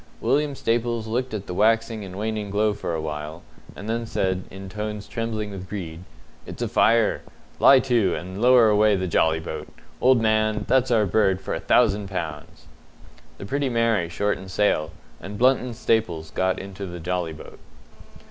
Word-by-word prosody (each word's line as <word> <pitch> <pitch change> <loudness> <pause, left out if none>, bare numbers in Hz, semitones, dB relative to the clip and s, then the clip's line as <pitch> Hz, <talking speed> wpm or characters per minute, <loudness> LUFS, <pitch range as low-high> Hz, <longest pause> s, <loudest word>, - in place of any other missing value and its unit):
William 140 +4 +1
Staples 115 -1 -1
looked 125 +3 -2
at 105 -2 -5
the - - -6
waxing 115 +2 +1
and 95 -1 -8
waning 105 -1 -3
glow 105 +1 +1
for 85 -4 -4
a - - -2
while, 75 +1 -6 0.3
and 100 - -8
then 115 +1 -2
said, 95 -3 -1
in 95 +1 -9
tones 105 +1 -5
trembling 110 -2 -3
with 95 -1 -8
greed, 85 -5 -6 0.5
"It's - - -5
a - - -1
fire. 115 0 +3 0.4
Lie 135 -1 +7
to, 115 -8 +1
and 95 +3 -6
lower 125 -2 +6
away 105 0 +4
the 95 -1 -2
jolly 80 -2 +2
boat. 80 -1 -6 0.3
Old 130 -1 +5
man, 110 -1 +1
that's 130 -1 +3
our 110 -3 +3
bird 95 -1 +2
for - - -5
a - - -2
thousand 100 0 +2
pounds!" 80 -3 -6 0.7
The - - -8
Pretty 140 +5 -1
Mary 115 -7 +1
shortened 95 +1 -2
sail, 95 -5 +1 0.3
and 100 +2 -8
Blunt 130 +3 +4
and 125 -2 -6
Staples 90 -10 0
got 95 0 0
into 100 0 -7
the 90 0 -7
jolly 85 -1 -2
boat. - - -12
105 Hz, 175 wpm, -24 LUFS, 90-115 Hz, 0.7 s, Lie